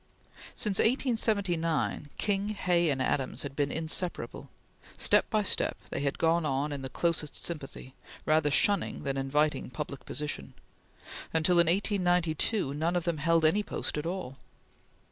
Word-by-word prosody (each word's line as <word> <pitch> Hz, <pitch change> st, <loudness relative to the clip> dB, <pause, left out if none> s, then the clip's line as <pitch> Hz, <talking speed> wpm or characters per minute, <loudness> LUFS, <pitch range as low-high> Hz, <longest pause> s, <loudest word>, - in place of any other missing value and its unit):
Since 205 Hz, -4 st, +2 dB
1879, 200 Hz, -, +1 dB
King, 200 Hz, 0 st, 0 dB
Hay, 175 Hz, -5 st, +1 dB
and 135 Hz, -2 st, 0 dB
Adams 130 Hz, 0 st, -1 dB
had 140 Hz, -1 st, -6 dB
been 145 Hz, -1 st, 0 dB
inseparable. 165 Hz, +2 st, -3 dB, 0.5 s
Step -, -, +3 dB
by 215 Hz, -2 st, +1 dB
step, -, -, +1 dB
they -, -, -2 dB
had 140 Hz, 0 st, -1 dB
gone 165 Hz, +1 st, +2 dB
on 145 Hz, 0 st, -1 dB
in 140 Hz, -1 st, -4 dB
the 130 Hz, -, -5 dB
closest 165 Hz, -2 st, -1 dB
sympathy, 135 Hz, -5 st, -7 dB, 0.3 s
rather 155 Hz, -1 st, +3 dB
shunning 200 Hz, +7 st, +2 dB
than 135 Hz, -1 st, -2 dB
inviting 145 Hz, +2 st, 0 dB
public 140 Hz, +1 st, -6 dB
position, 145 Hz, -, -4 dB, 0.8 s
until, 170 Hz, +2 st, +4 dB
in 170 Hz, -, +5 dB
1892, 180 Hz, -3 st, +1 dB
none 160 Hz, +4 st, 0 dB
of 175 Hz, -, +1 dB
them 170 Hz, -3 st, -1 dB
held 165 Hz, +1 st, +3 dB
any 195 Hz, +7 st, +4 dB
post -, -, -3 dB
at 150 Hz, +2 st, -3 dB
all. 170 Hz, -8 st, -4 dB
160 Hz, 145 wpm, -29 LUFS, 145-180 Hz, 0.8 s, in